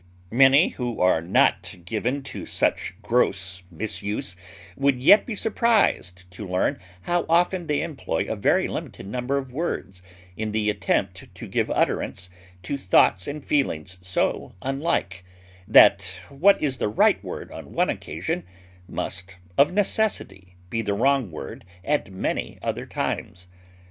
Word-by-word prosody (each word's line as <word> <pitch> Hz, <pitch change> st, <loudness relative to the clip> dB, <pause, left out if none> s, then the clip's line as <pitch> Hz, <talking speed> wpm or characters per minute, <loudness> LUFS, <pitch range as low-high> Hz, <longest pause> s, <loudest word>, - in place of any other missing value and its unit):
Many 135 Hz, +6 st, +6 dB
who 120 Hz, -2 st, -4 dB
are 90 Hz, -3 st, +3 dB
not 95 Hz, +2 st, +2 dB
given 125 Hz, +8 st, -2 dB
to -, -, -8 dB
such 90 Hz, -, 0 dB
gross 95 Hz, -5 st, +1 dB
misuse 100 Hz, +1 st, -3 dB, 0.4 s
would 140 Hz, -2 st, +1 dB
yet 175 Hz, +11 st, +6 dB
be 230 Hz, -, -3 dB
surprised 205 Hz, -, +1 dB
to 95 Hz, +3 st, -8 dB
learn 90 Hz, 0 st, 0 dB, 0.2 s
how 175 Hz, 0 st, +1 dB
often 175 Hz, +1 st, +2 dB
they 150 Hz, -1 st, 0 dB
employ 160 Hz, -5 st, -3 dB
a -, -, -2 dB
very 100 Hz, -, +2 dB
limited -, -, -6 dB
number 125 Hz, +6 st, -2 dB
of 135 Hz, -2 st, -4 dB
words 95 Hz, -, -4 dB, 0.3 s
in 110 Hz, +1 st, -3 dB
the 105 Hz, -1 st, +1 dB
attempt 100 Hz, -3 st, -1 dB
to -, -, -8 dB
give -, -, 0 dB
utterance 90 Hz, 0 st, -1 dB, 0.3 s
to 140 Hz, +9 st, -3 dB
thoughts 95 Hz, -3 st, +3 dB
and 145 Hz, 0 st, -6 dB
feelings 90 Hz, -, -1 dB
so 90 Hz, 0 st, -1 dB
unlike, 135 Hz, -, -1 dB, 0.4 s
that -, -, +7 dB, 0.3 s
what 185 Hz, +9 st, +4 dB
is 135 Hz, -4 st, -1 dB
the -, -, 0 dB
right 105 Hz, -, +3 dB
word -, -, -7 dB
on -, -, -10 dB
one -, -, +1 dB
occasion -, -, -4 dB, 0.4 s
must 95 Hz, 0 st, -5 dB, 0.2 s
of 140 Hz, -, +5 dB
necessity 190 Hz, -, -1 dB, 0.2 s
be 115 Hz, -, 0 dB
the 100 Hz, -2 st, -1 dB
wrong 135 Hz, 0 st, +2 dB
word 80 Hz, -, -8 dB, 0.2 s
at 145 Hz, -9 st, 0 dB
many 95 Hz, -, -3 dB
other -, -, -3 dB
times. 90 Hz, 0 st, -4 dB
115 Hz, 145 wpm, -24 LUFS, 95-145 Hz, 0.4 s, that